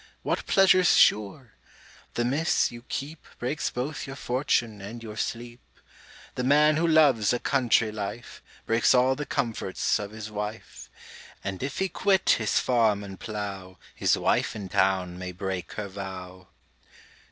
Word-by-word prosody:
What - - -2
pleasure's 185 -2 +5
sure? 105 +3 +3 0.6
The 120 - 0
Miss 145 +7 +1
you 120 0 -10
keep 150 +3 -5
Breaks 135 +5 -2
both 135 +5 -4
your 135 - -7
fortune 120 -5 -1
and 115 +4 -8
your 110 -1 -8
sleep. 120 +2 -5 0.7
The 125 - -3
man 150 +3 +4
who 170 +1 +2
loves 140 -10 +4
a - - +1
country 120 -5 +2
life, 105 +3 -6 0.2
Breaks 115 +3 +3
all 125 +1 +4
the 145 +1 -5
comforts 115 -7 -1
of 100 -1 -5
his 110 0 -8
wife; 105 +1 -6 0.5
And 95 -1 -4
if 135 +1 -4
he 190 - +1
quit 190 +1 +2
his 110 - +1
farm 110 -5 +2
and 95 -1 -9
plough, 100 -4 -6 0.2
His - - +2
wife - - +1
in 100 -3 -6
town 90 -2 +1
may 90 0 -5
break 95 -1 -4
her 105 -1 -4
vow. 95 -2 -8
115 Hz, 150 wpm, -26 LUFS, 100-135 Hz, 0.7 s, pleasure's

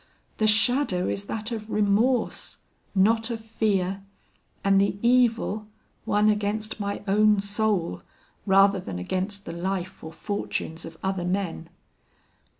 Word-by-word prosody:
The 215 - +2
shadow 215 -3 +2
is 200 - -2
that 220 +2 -4
of 220 -1 -5
remorse, 215 +4 +1 0.4
not 225 +4 +3
of 230 -2 -3
fear, 200 -4 -1 0.6
and 195 0 +4
the 200 0 +1
evil, 235 -3 +2 0.4
one 210 +1 +3
against 215 +1 0
my 200 0 -3
own 210 +1 +4
soul, 200 - 0 0.5
rather 195 0 +5
than 95 - -6
against 190 - -3
the - - -6
life 185 +1 -4
or 160 - -7
fortunes 165 -3 -4
of 165 0 -10
other 190 -2 -1
men. 180 -3 -2
200 Hz, 130 wpm, -26 LUFS, 190-220 Hz, 0.6 s, rather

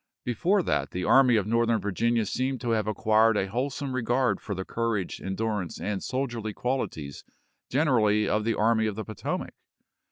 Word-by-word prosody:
Before 175 - +1
that - - 0
the 90 - -4
Army 130 +1 +5
of 105 -3 +2
Northern 115 +1 +2
Virginia 115 +3 0
seemed 130 +5 -2
to 120 -2 -1
have 110 -2 +1
acquired 110 +1 +3
a 95 - +1
wholesome 130 +5 -3
regard 125 +1 +1
for 100 - -4
the 95 +1 -4
courage, 115 -5 -2
endurance, 100 -2 -3
and 105 -1 -3
soldierly 120 -5 -3
qualities 90 - -3 0.5
generally 110 -7 +2
of 105 +1 +1
the 115 0 0
Army 110 +1 +2
of 105 - -3
the 110 - -5
Potomac. 110 -3 -4
115 Hz, 165 wpm, -27 LUFS, 105-125 Hz, 0.5 s, Army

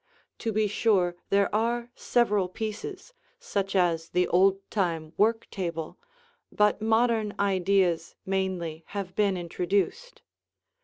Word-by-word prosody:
To 225 - -2
be 215 0 +2
sure 195 -4 +2
there 200 0 +2
are 235 +2 0
several 210 -8 +1
pieces, 225 - -6 0.3
such 200 - -2
as 170 -3 +2
the 180 0 +1
old 195 +2 +3
time 165 -6 -1
work 225 +2 +2
table, 170 -4 -4 0.5
but 210 0 +2
modern 225 -1 +2
ideas 190 -3 +1
mainly 185 -4 -2
have 195 -3 -5
been 200 -3 +2
introduced. 185 - -2
195 Hz, 115 wpm, -27 LUFS, 180-215 Hz, 0.5 s, old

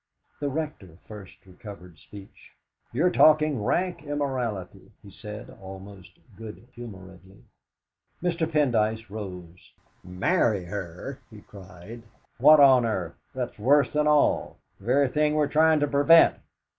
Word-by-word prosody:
The 145 - -2
Rector 140 - -6
first 100 -3 -13
recovered 90 -3 -13
speech. 100 -1 -15 0.4
"You're 165 +9 +1
talking 155 -8 +3
rank 180 - -1
immorality," 130 -10 -4
he 100 - -14
said 105 +2 -10
almost 95 0 -12 0.2
good 110 +2 -11
humouredly. 95 -4 -13 0.8
Mr. 170 -2 -1
Pendyce 110 -8 0
rose. 90 -5 -10 0.3
"Marry 100 - 0
her!" 95 +7 -7
he 110 -2 -14
cried. 100 +3 -13 0.4
"What 150 +4 +7
on 135 -3 +6
earth 95 -7 -3 0.2
that's 125 -3 -5
worse 140 +4 +3
than 150 0 +1
all 150 -1 +1 0.2
the 100 - -17
very 135 +4 +2
thing 150 +3 0
we're 150 -1 +2
trying 155 +1 +3
to 145 - +1
prevent! 145 +4 +5
115 Hz, 125 wpm, -25 LUFS, 95-145 Hz, 0.8 s, What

